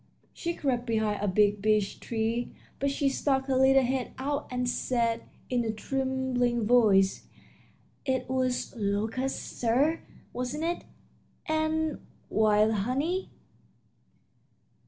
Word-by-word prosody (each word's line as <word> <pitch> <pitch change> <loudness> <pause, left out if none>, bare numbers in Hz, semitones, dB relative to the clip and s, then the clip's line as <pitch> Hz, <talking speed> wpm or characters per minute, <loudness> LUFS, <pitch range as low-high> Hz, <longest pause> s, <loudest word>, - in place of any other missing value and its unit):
She 340 0 -3
crept 250 -3 -1
behind 220 -3 0
a - - +1
big 205 +1 +3
beech 210 -1 +1
tree, 230 +1 -2 0.3
but 280 - +1
she 280 0 0
stuck 270 0 +1
her 265 -1 0
little 265 +1 +5
head 255 0 -1
out 285 +2 -2
and 250 -1 -1
said, 235 -2 0 0.2
in 245 -1 0
a 225 - -1
trembling 250 0 -1
voice: 205 -5 +4 0.8
"It 260 -1 -1
was 255 -1 -1
locusts, 220 +5 -2
sir, 265 +8 +2 0.3
wasn't 250 +5 -3
it 345 +1 -2 0.6
and 315 0 0 0.3
wild 215 0 +4
honey?" 270 - -1
250 Hz, 115 wpm, -28 LUFS, 220-270 Hz, 0.8 s, little